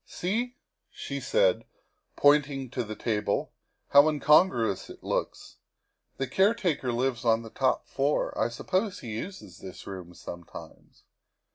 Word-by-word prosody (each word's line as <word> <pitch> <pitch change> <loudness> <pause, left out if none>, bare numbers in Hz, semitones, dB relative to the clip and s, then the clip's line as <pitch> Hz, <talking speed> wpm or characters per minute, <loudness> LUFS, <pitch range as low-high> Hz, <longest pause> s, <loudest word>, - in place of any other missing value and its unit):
" - - -50
See," 235 +7 -1 0.3
she - - -6
said, - - +2 0.5
pointing 145 -3 +3
to 125 - -2
the 110 -1 -6
table, 105 -3 -1 0.2
" - - -49
how 140 +1 +8
incon 155 +4 +5
gruous 115 - -2
it - - -12
looks. - - -3 0.6
The 135 - -1
caretaker 185 - +1
lives 120 0 -1
on 115 -1 +3
the 115 - -10
top 130 -1 +1
floor; 140 +2 0
I 110 - +1
suppose 185 - -2
he 115 -3 -6
uses 180 - -8
this 95 -1 -10
room 90 -3 -8
sometimes. 85 0 -11
135 Hz, 145 wpm, -28 LUFS, 110-180 Hz, 0.6 s, how